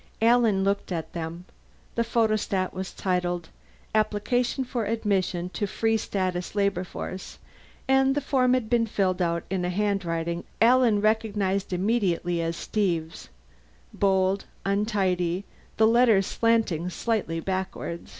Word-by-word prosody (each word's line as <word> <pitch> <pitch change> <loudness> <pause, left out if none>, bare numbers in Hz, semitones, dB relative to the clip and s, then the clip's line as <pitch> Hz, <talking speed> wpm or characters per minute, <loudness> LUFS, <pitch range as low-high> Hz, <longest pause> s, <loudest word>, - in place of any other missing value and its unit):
Alan 230 -4 +4
looked 200 0 -1
at 165 -3 -4
them. 170 +1 -5 0.5
The 235 - 0
photostat 215 -5 0
was 190 0 -5
titled, 180 -2 -2 0.4
APPLICATION 220 +5 +1
FOR 245 -3 -3
ADMISSION 195 -5 -1
TO 205 +2 -2
FREE 225 +3 +1
STATUS 185 -3 -2
LABOR 200 -3 +1
FORCE, 185 +1 -7 0.5
and 265 0 +4
the - - +2
form 255 -2 +2
had 250 -4 -1
been 230 0 +2
filled 190 -3 0
out 170 -1 0
in 190 -2 0
a 180 - 0
handwriting 175 -4 -1 0.2
Alan 235 -3 +5
recognized 205 -3 0
immediately 180 -3 0
as 165 0 -2
Steve's: 170 -7 -2 0.6
bold, 190 0 +1 0.2
untidy, 195 -3 0 0.3
the 220 - +5
letters 225 -4 +5
slanting 220 -8 +1
slightly 190 -5 -1
backward. 185 -1 -4
195 Hz, 125 wpm, -26 LUFS, 180-225 Hz, 0.6 s, Alan